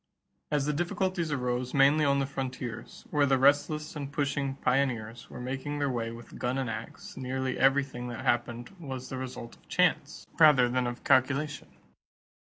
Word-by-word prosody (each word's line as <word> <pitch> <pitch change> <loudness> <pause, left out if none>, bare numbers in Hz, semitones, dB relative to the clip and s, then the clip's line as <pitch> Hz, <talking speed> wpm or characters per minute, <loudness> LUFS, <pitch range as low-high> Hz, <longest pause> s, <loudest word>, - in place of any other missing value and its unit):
As 145 -2 +1
the 150 - 0
difficulties 175 +1 -1
arose 125 -2 -1
mainly 140 +3 +5
on 140 0 +3
the 135 - +1
frontiers, 130 -3 -6
where 145 -1 +3
the 135 -1 +4
restless 150 +4 +2
and 140 -2 -5
pushing 140 -1 -1
pioneers 125 -4 -1
were - - -9
making 135 +4 -4
their 145 -2 0
way 115 -2 -2
with 115 0 -10
gun 125 +2 -1
and 130 -4 -1
ax, 110 +1 -8
nearly 130 0 -3
everything 135 -2 +2
that 120 -2 -6
happened 120 0 0
was 130 -5 -6
the 130 - -4
result 125 -2 -7
of - - -29
chance - - +1
rather 150 -6 +7
than 125 0 0
of 120 0 -6
calculation. 140 +3 +2
135 Hz, 165 wpm, -29 LUFS, 125-145 Hz, -, rather